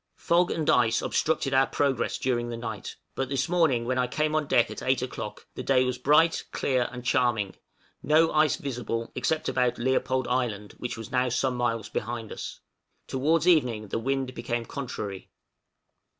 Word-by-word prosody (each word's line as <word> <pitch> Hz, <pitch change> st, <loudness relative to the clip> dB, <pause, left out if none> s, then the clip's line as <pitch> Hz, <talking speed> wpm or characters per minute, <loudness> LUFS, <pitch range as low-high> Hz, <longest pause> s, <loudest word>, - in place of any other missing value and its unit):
Fog 175 Hz, +1 st, +2 dB
and 155 Hz, -2 st, -2 dB
ice 120 Hz, -2 st, +4 dB
obstructed 150 Hz, -3 st, 0 dB
our 135 Hz, 0 st, +4 dB
progress 140 Hz, -4 st, 0 dB
during 120 Hz, -2 st, -1 dB
the 120 Hz, -, -4 dB
night; 110 Hz, -4 st, -6 dB, 0.2 s
but 135 Hz, -1 st, -2 dB
this 135 Hz, +1 st, 0 dB
morning 160 Hz, -9 st, +2 dB
when 130 Hz, +1 st, 0 dB
I 125 Hz, -, +2 dB
came 155 Hz, +4 st, 0 dB
on 155 Hz, -2 st, 0 dB
deck -, -, +3 dB
at -, -, -7 dB
eight -, -, +1 dB
o'clock, -, -, -6 dB
the -, -, -6 dB
day 130 Hz, -2 st, +3 dB
was 125 Hz, -1 st, -2 dB
bright, 150 Hz, +5 st, +4 dB
clear, 130 Hz, -3 st, 0 dB
and 125 Hz, 0 st, -8 dB
charming; 120 Hz, -7 st, +1 dB, 0.5 s
no 160 Hz, +2 st, +4 dB
ice 155 Hz, -2 st, +4 dB
visible, 115 Hz, -4 st, -4 dB
except 160 Hz, -1 st, -1 dB
about 125 Hz, -2 st, +1 dB
Leopold 130 Hz, +1 st, 0 dB
Island, 120 Hz, -5 st, -1 dB
which 125 Hz, -1 st, -4 dB
was 115 Hz, +3 st, -8 dB
now 125 Hz, -1 st, +2 dB
some 125 Hz, +1 st, 0 dB
miles 115 Hz, -3 st, -1 dB
behind 115 Hz, 0 st, -4 dB
us. -, -, -7 dB, 0.4 s
Towards 155 Hz, +5 st, +1 dB
evening 125 Hz, -, +3 dB
the -, -, -1 dB
wind 135 Hz, +1 st, -1 dB
became 120 Hz, -1 st, -3 dB
contrary. 105 Hz, -9 st, -6 dB
125 Hz, 175 wpm, -27 LUFS, 120-140 Hz, 0.5 s, ice